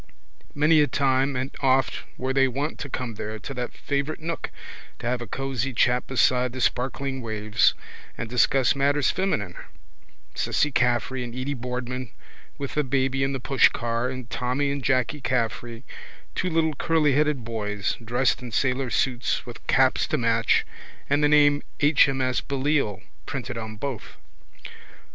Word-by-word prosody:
Many 150 +2 +5
a 145 - +3
time 135 -1 +1
and 130 +2 -3
oft 135 -1 +2 0.2
were 130 +1 -2
they 135 0 +4
wont 140 +5 -3
to 145 - -5
come 125 -3 -4
there 110 +1 -5
to 125 +7 -7
that 125 -1 -4
favourite 140 +2 -2
nook 165 +1 -4 0.5
to - - -9
have 125 0 0
a 120 - -5
cosy 135 +1 -2
chat 125 +1 +2
beside 125 0 +2
the 130 - -5
sparkling 130 +2 -1
waves 110 -1 +1 0.4
and 115 - -4
discuss 125 +3 +3
matters 140 +1 +2
feminine, 110 - -1 0.8
Cissy 150 - +1
Caffrey 125 0 +1
and 120 -1 -7
Edy 130 +3 -2
Boardman 125 0 -4 0.5
with 140 -1 -5
the 150 - +1
baby 135 0 0
in 135 0 0
the 135 - -2
pushcar 120 -2 +2
and 130 -2 -7
Tommy 130 +4 -1
and 140 -1 -3
Jacky 130 +2 +1
Caffrey, 120 -1 -2 0.5
two 185 - -1
little 160 -2 +1
curlyheaded 150 -3 +2
boys, 105 -3 -2
dressed 125 +3 +1
in 125 -2 -7
sailor 130 +2 0
suits 125 +2 0
with 120 -2 -11
caps 130 -1 +3
to 155 - 0
match 115 -2 +2 0.5
and 145 +1 +3
the 150 - +5
name 145 -1 +5 0.2
H. 145 -1 +5
M. 135 -1 -1
S. 130 -1 +1
Belleisle 135 -7 0 0.2
printed 130 -2 -4
on 110 -1 -5
both. 130 0 -6
130 Hz, 155 wpm, -25 LUFS, 120-140 Hz, 0.8 s, Many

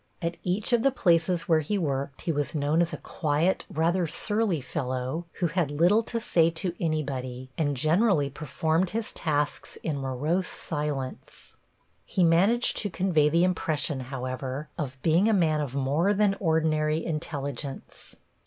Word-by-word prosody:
At 170 0 -3
each 195 +7 -1
of 235 - +4
the 275 - +4
places 175 - +2
where 160 -2 +4
he 155 +7 -1
worked 140 -5 -2
he 170 - -1
was 145 +1 -2
known 150 +3 +2
as 170 - +1
a - - -4
quiet, 155 +3 0
rather 170 +3 +1
surly 210 0 0
fellow, 130 +3 -3
who 180 - -2
had 165 -2 0
little 175 +9 +4
to 230 +1 -3
say 165 -7 +3
to 170 +2 -2
anybody, 130 -5 -3
and 145 -4 0
generally 160 - +3
performed 160 +5 -1
his 225 +2 -3
tasks 150 -3 -2
in 150 -4 -2
morose 145 +8 -1
silence. 145 -4 -5 0.5
He 185 - 0
managed 190 +9 +4
to 205 - -1
convey 170 -5 +2
the 170 +3 +3
impression, 160 -5 0
however, 130 +2 -5
of 135 -4 -5
being 170 +6 +4
a 225 - +3
man 160 -6 +2
of 140 -3 -4
more 145 +9 +1
than 200 -1 +3
ordinary 160 -2 +1
intelligence. 145 -4 -5
160 Hz, 155 wpm, -27 LUFS, 145-180 Hz, 0.5 s, of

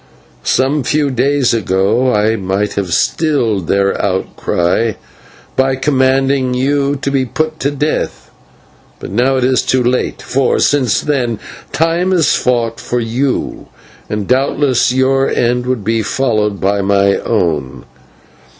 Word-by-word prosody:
Some 135 - +1
few 145 +1 0
days 130 +1 +1
ago 110 +4 +1
I 105 +1 +2
might 100 +1 -2
have 95 -3 -3
stilled 115 - 0
their 100 +2 +1
outcry 95 +2 0 0.6
by 130 0 +2
commanding 135 -1 +1
you 140 +2 +1
to 140 - 0
be 135 -1 +1
put 155 +5 -3
to 140 - 0
death, 145 +2 -3 0.7
but - - -8
now 125 +6 +2
it 130 - 0
is 130 0 +2
too 130 -1 +1
late, 125 +1 -1
for, 135 0 0
since 130 -7 +2
then, 125 -6 -1 0.3
Time 165 +3 +1
has 165 -6 +3
fought 120 -2 0
for 125 - -2
you, 125 +4 -2 0.4
and 105 -2 -3
doubtless 130 0 +2
your 135 +1 +2
end 125 +1 0
would 125 -5 -1
be 115 +2 0
followed 105 -2 -1
by 100 +1 +1
my 100 0 +2
own. 75 - -2
125 Hz, 135 wpm, -15 LUFS, 105-135 Hz, 0.7 s, has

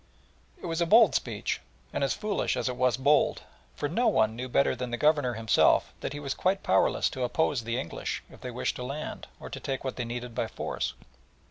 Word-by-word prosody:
It - - -9
was 165 0 -2
a 170 - +2
bold 220 0 +7
speech, 110 -4 -2 0.3
and - - 0
as 135 - +1
foolish 210 -1 -1
as - - -1
it 125 - -2
was 125 -1 +2
bold, 145 +3 +3 0.3
for 145 - -2
no 230 +11 +1
one 110 0 +3
knew 125 +2 -5
better 140 +2 +3
than 125 0 -4
the 120 - -2
Governor 145 -5 +2
himself 110 -1 +3
that - - -4
he 145 - -5
was 140 -2 -3
quite 190 +2 0
powerless - - +3
to 130 - -5
oppose 125 -1 0
the 115 +1 -1
English 85 - -4
if - - -15
they 125 - -5
wished 125 0 -2
to 125 - -5
land, 140 +4 -5
or - - -8
to - - -5
take 135 -1 -3
what 130 -2 -4
they 120 - -2
needed 120 0 -5
by - - -1
force. - - -3
130 Hz, 225 wpm, -28 LUFS, 120-155 Hz, 0.3 s, bold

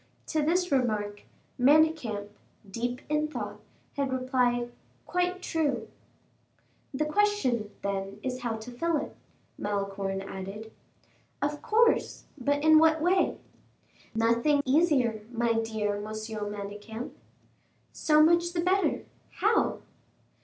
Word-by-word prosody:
To 315 - +1
this 355 +3 +1
remark, 215 -6 0 0.4
Manicamp, 265 -7 +3 0.4
deep 245 +5 -3
in 300 0 +1
thought, 305 - -6 0.4
had 275 -2 -1
replied, 250 -2 +1 0.3
"Quite 360 +1 -1
true!" 275 -11 -1 1.0
"The 300 +2 -1
question, 305 - +1
then, 195 0 -3
is 255 -1 -3
how 235 -2 -2
to 220 +3 -8
fill 330 +6 0
it?" - - -5 0.4
Malicorne 195 -1 -2
added. 195 +3 -7 0.7
"Of 290 +1 -2
course; 460 +2 +2
but 285 +1 0
in 315 0 +7
what 320 0 +4
way?" 360 +4 +2 0.8
"Nothing 235 +6 +3
easier, 260 -6 +3
my 235 -1 +1
dear 220 -2 -1
Monsieur 215 0 -5
Manicamp." 205 +3 -6 0.8
"So 305 -1 +4
much 340 +2 +3
the 340 - 0
better. 375 +3 +1 0.3
How?" - - +1
250 Hz, 110 wpm, -28 LUFS, 215-310 Hz, 1.0 s, in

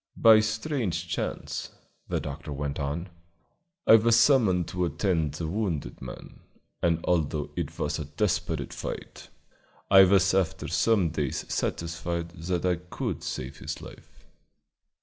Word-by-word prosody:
"By 110 -1 +8
a - - +5
strange 110 - -2
chance," - - -3 0.4
the - - -1
doctor 75 +2 -6
went 70 0 -3
on, 75 +6 -3 0.8
"I 115 - +9
was 115 +1 +4
summoned 105 - +4
to 90 0 -2
attend 80 -3 0
the 80 - -4
wounded 85 - -3
man, 65 -2 -9 0.4
and 85 -1 +1
although 80 -4 0
it - - -4
was 75 +2 -1
a 75 - -4
desperate 85 +7 -1
fight, - - -7 0.6
I 95 -1 +9
was 95 -1 +4
after 95 -4 0
some 105 -7 +2
days 75 -4 -2
satisfied 85 0 -2
that 85 +1 -3
I 90 -1 +2
could 90 +2 -4
save 65 +2 -5
his - - -5
life." - - -14
85 Hz, 140 wpm, -27 LUFS, 80-95 Hz, 0.8 s, I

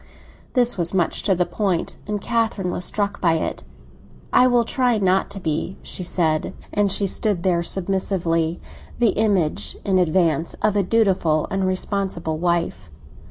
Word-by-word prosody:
This 245 -6 +2
was 170 +2 +2
much 175 -3 +1
to 195 - +2
the 180 0 +1
point, 190 -5 -1
and 210 0 -2
Catherine 220 -4 -1
was 180 - 0
struck 200 -1 -2
by 170 -3 +3
it. 160 - -2 0.7
"I 255 - +6
will 240 -2 +3
try 245 -1 +1
not 190 -1 +2
to 200 - -7
be," 160 +2 -2
she 185 - -5
said. 160 -3 0 0.2
And 205 -1 +2
she 200 +1 0
stood 195 -2 -1
there 175 -2 +2
submissively, 175 -3 0 0.4
the 235 -2 +3
image, 200 -9 0
in 190 -2 +3
advance, 165 -2 +1
of 210 -1 +2
a 205 - +3
dutiful 185 -7 +2
and 195 -1 0
responsible 185 -4 -2
wife. 170 - -1
185 Hz, 160 wpm, -22 LUFS, 170-205 Hz, 0.7 s, I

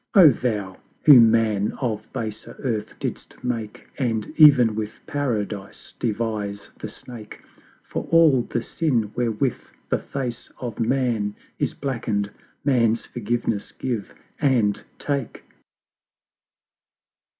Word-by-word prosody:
LXXXI. - - +8
Oh 155 - +10
Thou, 105 -6 -2 0.3
who 145 -5 +10
Man 110 -3 +4
of 110 -5 -3
baser 110 -1 -5
Earth 110 -5 -2
didst - - -6
make, 115 -4 -4
And 115 -2 -1
ev'n 135 -7 +8
with 105 0 -3
Paradise 110 -8 -3
devise 105 -3 -2
the - - -5
Snake: 115 -4 -10 0.4
For - - -5
all 160 -6 +6
the 120 0 -3
Sin 120 -10 0
wherewith 120 +1 0 0.3
the - - +1
Face 125 -4 -5
of 120 -3 -5
Man 115 -4 +1 0.2
Is - - 0
blacken'd 110 -7 -2 0.3
Man's 115 -5 +3
forgiveness 115 -2 -2
give 120 -6 -4 0.2
and 120 -8 +2
take! 140 -1 -3
115 Hz, 115 wpm, -24 LUFS, 105-130 Hz, 0.4 s, Oh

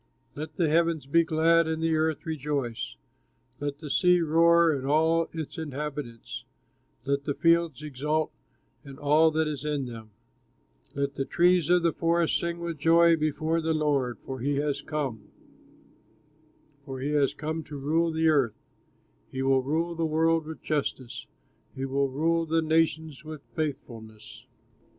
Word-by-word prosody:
Let 155 +1 -7
the 170 - +1
heavens 165 -1 +1
be 165 +5 +3
glad, 165 +1 +3
and 160 0 -2
the 165 -1 +2
earth 155 -1 0
rejoice, 145 -6 -3 0.6
Let 145 -1 -3
the 150 -1 -8
sea 180 +2 +4
roar 170 +1 +4
and 140 -3 -2
all 160 +4 +3
of 165 - -7
its 160 +1 -5
inhabitants, 145 -5 -6 0.6
Let 140 +1 -1
the 145 - -1
fields 165 -4 +2
exult, 150 +2 -1 0.5
and 140 -2 -11
all 150 +2 +4
that 160 0 0
is 150 -3 -4
in 150 -3 -1
them, 115 -3 -9 0.9
Let 140 0 -1
the 135 - -3
trees 175 0 +3
of 180 -1 +4
the 170 -2 +2
forest 170 0 +1
sing 170 0 -3
with 170 -3 -4
joy 165 +2 +5
Before 155 +1 0
the 160 0 0
Lord, 140 -5 0
for 130 -1 -5
he 140 +4 0
has 145 0 -1
come, 140 -7 -4 1.5
For 135 -2 -7
he 140 +3 -2
has 145 -2 +2
come 155 +1 -4
to 145 - -8
rule 160 +5 +1
the 160 0 +1
earth; 140 -8 +2 0.7
He 130 0 -3
will 135 0 +3
rule 160 +6 -1
the 165 0 -3
world 160 0 +1
with 160 - -8
justice, 135 -4 -3 0.5
He 135 - -3
will 135 +1 0
rule 165 +4 0
the 165 +1 +1
nations 160 -2 0
with 155 -2 -9
faithfulness. 115 -8 -6
155 Hz, 160 wpm, -27 LUFS, 140-165 Hz, 1.5 s, joy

